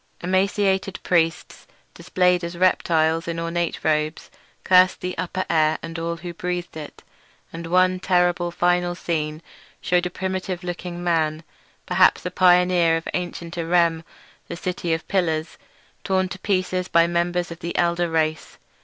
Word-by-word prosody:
Emaciated 190 +1 0
priests, 165 -1 0 0.3
displayed 180 -1 +1
as 170 0 -5
reptiles 165 -3 +2
in 165 0 -3
ornate 170 0 -2
robes, 155 0 -1 0.3
cursed 185 0 +5
the 180 0 -4
upper 185 +2 -3
air 155 -1 +2
and 165 0 -6
all 170 0 -3
who 175 0 -7
breathed 175 0 -4
it; 155 -2 -9 0.5
and 165 0 -6
one 185 +1 +3
terrible 175 -1 +1
final 175 0 +1
scene 155 -2 -3 0.4
shewed 180 0 +1
a - - -6
primitive 185 0 -4
looking 175 0 -5
man, 160 -2 0 0.4
perhaps - - +3
a 180 - -2
pioneer 180 -2 +4
of 165 - -7
ancient 175 -1 -4
Irem, 165 -1 +2 0.4
the - - -6
City 175 -1 -3
of 160 - -9
Pillars, 160 -4 -1 0.4
torn 190 -1 +1
to 190 - -7
pieces 185 -2 -1
by 170 0 +4
members 175 +1 -1
of 170 - -8
the 170 -1 -5
elder 170 0 +1
race. 160 -1 -1
175 Hz, 145 wpm, -23 LUFS, 165-180 Hz, 0.5 s, cursed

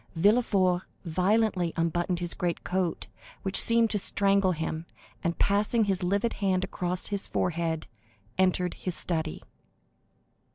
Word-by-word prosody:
Villefort 190 -1 +3 0.2
violently 185 +1 +1
unbuttoned 175 +2 0
his 175 -1 -2
greatcoat, 180 0 -2 0.4
which 195 0 +6
seemed 230 -1 +3
to 210 - +2
strangle 195 -1 +2
him, 160 0 -4 0.4
and 170 0 -1
passing 210 +3 +2
his 195 -3 0
livid 200 +6 0
hand 190 -2 +1
across 180 -1 -2
his 200 -1 -3
forehead, 165 -2 -1 0.5
entered 180 -1 +2
his 180 -2 -4
study. 160 -2 -2
185 Hz, 120 wpm, -28 LUFS, 170-200 Hz, 0.5 s, which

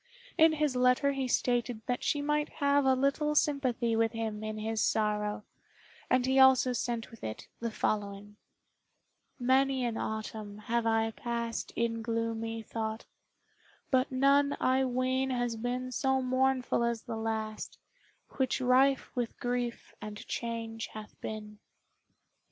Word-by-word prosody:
In 320 0 +6
his 300 -4 0
letter 250 +3 +3
he 270 -2 -2
stated 245 -2 0
that 250 0 -2
she 290 -1 0
might 295 0 0
have 285 -2 +2
a 265 0 +5
little 280 +3 +1
sympathy 255 -6 +1
with 225 0 +2
him 220 -2 -3
in 215 0 -4
his 220 0 -1
sorrow, 210 -1 0 0.7
and 255 -1 +3
he 265 +1 +3
also 260 -1 +6
sent 235 -1 -3
with 230 - -14
it 110 0 -6
the 235 - -2
following: 205 -1 -2 1.0
"Many 260 0 +2
an 230 -2 -2
autumn 215 -1 -4
have 230 +2 -1
I 225 0 +2
past 235 0 -3
In 230 -1 0
gloomy 225 0 -2
thought, 220 0 -4 0.9
but 260 0 +2
none 280 +2 +3
I 260 +1 +3
ween 255 +1 0
Has 245 -2 -1
been 250 +2 -3
so 265 +1 +1
mournful 255 -1 +1
as 235 -1 -1
the 235 -3 -5
last, 220 -1 -3 0.6
Which 260 -2 +1
rife 260 +2 +3
with 240 -2 -3
grief 245 -1 -3
and 210 -1 -6
change 230 -1 -4
hath 215 -1 -9
been." 210 -1 -6
240 Hz, 140 wpm, -31 LUFS, 225-260 Hz, 1.0 s, In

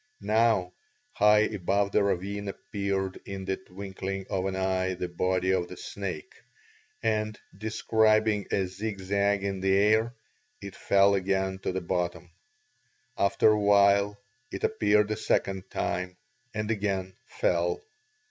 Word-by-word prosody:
Now 110 -4 +2 0.4
high 105 0 +5
above 100 -1 0
the 105 - +3
ravine 100 +1 -1
appeared 100 -3 -3
in 95 -1 -6
the 95 0 -1
twinkling 95 0 -6
of 95 0 0
an 95 - -3
eye 95 0 0
the 90 0 -3
body 90 +1 0
of 90 -2 +1
the 90 - -10
snake, 95 -6 -6 0.7
and, 110 -1 0 0.2
describing 110 0 +2
a 95 - +1
zigzag 100 +1 -1
in 100 -1 -2
the 95 +1 +2
air, 110 +4 +3 0.4
it 100 -1 -9
fell 100 0 +4
again 95 0 0
to - - -2
the 95 +1 -3
bottom. 85 -1 -3 0.8
After 100 +2 +3
a 105 - +2
while 100 0 +4 0.3
it - - -6
appeared 105 - +2
a - - +1
second 95 -3 -1
time 90 +1 -3 0.3
and 110 0 -2
again 95 -3 -2
fell. 475 -3 0
100 Hz, 135 wpm, -28 LUFS, 95-105 Hz, 0.8 s, high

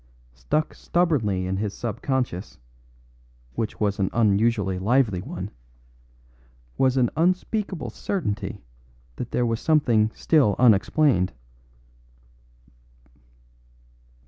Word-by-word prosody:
Stuck - - -1
stubbornly 125 - 0
in 95 +1 -2
his 105 0 -3
sub 115 0 -5
consciousness 120 - -2 1.0
(which 110 - -4
was 100 -2 0
an 95 - +1
unusually 105 -3 +2
lively 105 -2 +2
one) - - -6 1.2
was 130 0 +2
an 125 -2 +2
unspeakable 185 - -1
certainty 110 - -3 0.5
that 125 - -5
there 125 - 0
was 115 -1 -1
something 120 -9 +3
still 135 - +3
unexplained. 115 - +3
115 Hz, 90 wpm, -24 LUFS, 100-135 Hz, 1.2 s, something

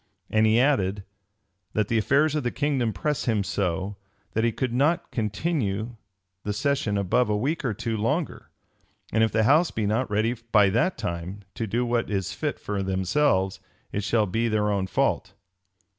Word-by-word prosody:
And 110 0 +4
he 110 +2 +4
added, 105 -8 +2 0.7
"That 105 -2 +1
the 115 0 +2
affairs 140 +7 +3
of 150 - 0
the 120 - -1
kingdom 135 -4 0
press 150 +8 -2
him 110 -4 +1
so, 95 +1 -2 0.4
that 110 - +1
he 115 - +3
could 125 +1 -2
not 155 +7 +1
continue 110 - -1 0.5
the 105 - -2
session 130 -3 0
above 100 +5 +2
a 105 - +1
week 145 +10 -1
or 120 -6 -1
two 115 +3 -2
longer: 145 +10 -2 0.6
and 110 +1 +3
if 110 - +2
the 110 0 +2
house 155 +9 +4
be 110 - -2
not 115 +4 0
ready 110 +3 +1 0.2
by 100 -3 +5
that 125 - +1
time 95 -1 -5
to 115 - -3
do 120 +5 0
what 120 -1 0
is 95 -3 -2
fit - - -2
for 100 -1 -3
themselves, 95 +2 +1 0.3
it 105 - -2
shall 110 +1 +2
be 115 +5 0
their 105 -2 +1
own 100 -2 0
fault." 95 - 0
110 Hz, 180 wpm, -25 LUFS, 100-125 Hz, 0.7 s, by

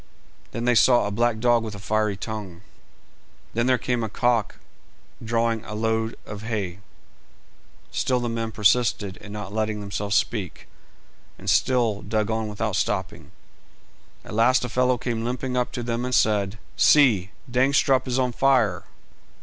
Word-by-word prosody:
Then 115 +1 -4
they 125 - +4
saw 120 -1 +5
a 105 - -2
black 120 +2 +1
dog 120 +1 +3
with 110 -2 -6
a - - -9
fiery 105 0 0
tongue. 100 -4 -6 0.9
Then 120 +2 0
there 130 -1 +4
came 125 -1 -1
a 110 - -3
cock 115 0 0 0.7
drawing 115 -1 0
a 105 - -7
load 110 +1 -1
of 105 -1 -8
hay. 105 -5 -3 1.1
Still 125 -1 0
the 120 - -2
men 115 -1 -3
persisted 105 -2 +1
in 105 - -11
not 105 -1 -6
letting 110 -1 -1
themselves 100 0 -3
speak, 100 -7 -2 0.7
and - - -12
still 120 -5 +2
dug 110 +1 -1
on 110 0 -1
without 105 -1 -3
stopping. 95 +1 -2 1.0
At - - -9
last 125 +3 +3
a - - -5
fellow 125 +2 +2
came 115 -1 -3
limping 125 +2 -3
up 125 -1 0
to 120 - -4
them 115 0 -2
and 125 0 0
said 105 -2 +2 0.2
"See, 115 -11 +5 0.2
Dangstrup 130 +1 +2
is 125 0 0
on 130 -1 +1
fire!" 120 -7 +2
110 Hz, 160 wpm, -24 LUFS, 105-125 Hz, 1.1 s, saw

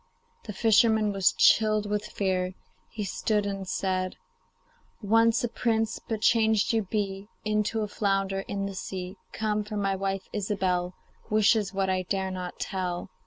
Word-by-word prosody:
The 210 - -6
fisherman 220 0 +4
was 195 -2 +3
chilled 215 -1 +4
with 210 0 -2
fear. 185 -2 -1 0.3
He 215 - -5
stood 210 +2 0
and 195 -1 -4
said: 185 0 -1 0.8
'Once 225 +2 +3
a - - +2
prince, 225 -1 0
but 220 -2 -4
changed 220 -1 +3
you 225 - +3
be 195 -1 -3 0.2
Into 215 +1 0
a 210 - -1
flounder 195 -1 0
in 195 0 -3
the 200 - -4
sea. 185 0 -6
Come! 210 -1 -1
for 210 0 -5
my 195 -1 0
wife, 195 0 -3
Ilsebel, 185 -3 -1 0.3
Wishes 215 -1 +3
what 195 -1 0
I 185 0 +1
dare 190 +1 -2
not 180 -1 -6
tell. 180 -1 -3
200 Hz, 155 wpm, -27 LUFS, 190-215 Hz, 0.8 s, fisherman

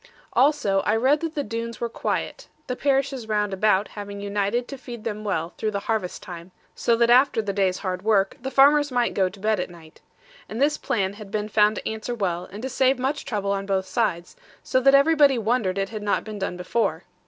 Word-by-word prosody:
Also 260 -8 +3
I 210 +2 +1
read 265 +6 +3
that 325 0 -4
the 290 - -1
Doones 230 0 -5
were 235 - -1
quiet; 230 - -3 0.2
the 250 - -3
parishes 270 -3 0
round 210 -2 0
about 200 0 +2
having 205 -1 -7
united 205 +4 -1
to 275 - -6
feed 240 -4 -9
them 215 -2 -4
well 170 -4 -2
through 220 - 0
the 200 -1 -3
harvest 210 -4 -3
time, 170 0 -9 0.2
so 235 - +1
that 235 0 +3
after 255 0 +5
the 205 -2 -2
day's 190 -2 +1
hard 185 -2 -3
work, 200 -2 +2
the 265 - -3
farmers 290 +1 +5
might 245 -1 +1
go 190 -2 +2
to 195 +2 -15
bed 215 0 +1
at 180 - -3
night. 165 -2 -16 0.5
And 220 - -5
this 295 +2 +2
plan 195 -3 -1
had 205 -1 -11
been 210 +1 -3
found 210 0 +3
to - - -5
answer 220 +2 -4
well, 180 -5 -2
and 205 +4 -8
to - - -1
save 265 0 +2
much 265 +3 -2
trouble 200 -3 -2
on 195 0 -2
both 190 -1 0
sides, 190 - -2 0.3
so 260 - +1
that 275 +2 +5
everybody 285 -2 +5
wondered 220 -4 0
it 195 0 -1
had 215 -2 -6
not 205 -1 0
been 215 -2 -7
done 190 -2 -3
before. 180 -2 -1
215 Hz, 220 wpm, -24 LUFS, 195-250 Hz, 0.5 s, after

